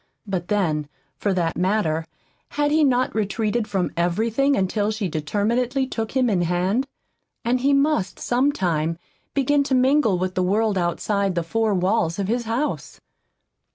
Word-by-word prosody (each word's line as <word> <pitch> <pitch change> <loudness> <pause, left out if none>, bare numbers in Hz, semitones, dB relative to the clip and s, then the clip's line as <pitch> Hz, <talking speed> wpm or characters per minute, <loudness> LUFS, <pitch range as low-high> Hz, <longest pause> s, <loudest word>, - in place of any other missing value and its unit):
But 185 -4 -3
then, 160 -8 0 0.3
for 205 - 0
that 175 -3 0
matter, 180 -4 0 0.5
had 290 0 +1
he 310 +1 +4
not 255 -2 +2
retreated 215 +1 -1
from 190 -3 -1
everything 225 +11 +1
until 205 +2 0
she 215 -2 -2
determinedly 225 - 0
took 225 -4 -4
him 260 -2 +2
in 195 -6 +1
hand? 180 +9 0 0.6
And 245 +2 +2
he 275 +3 +2
must 280 -8 +1
some 255 +4 +1
time 165 - -1 0.4
begin 280 +1 +3
to 270 - +1
mingle 255 -5 +3
with 185 +1 -2
the 185 - 0
world 205 +3 +1
outside 190 +2 0
the 170 - 0
four 220 +4 0
walls 180 -2 +1
of 200 -2 -2
his 235 +2 -1
house! 235 +7 -3
210 Hz, 155 wpm, -23 LUFS, 180-250 Hz, 0.6 s, he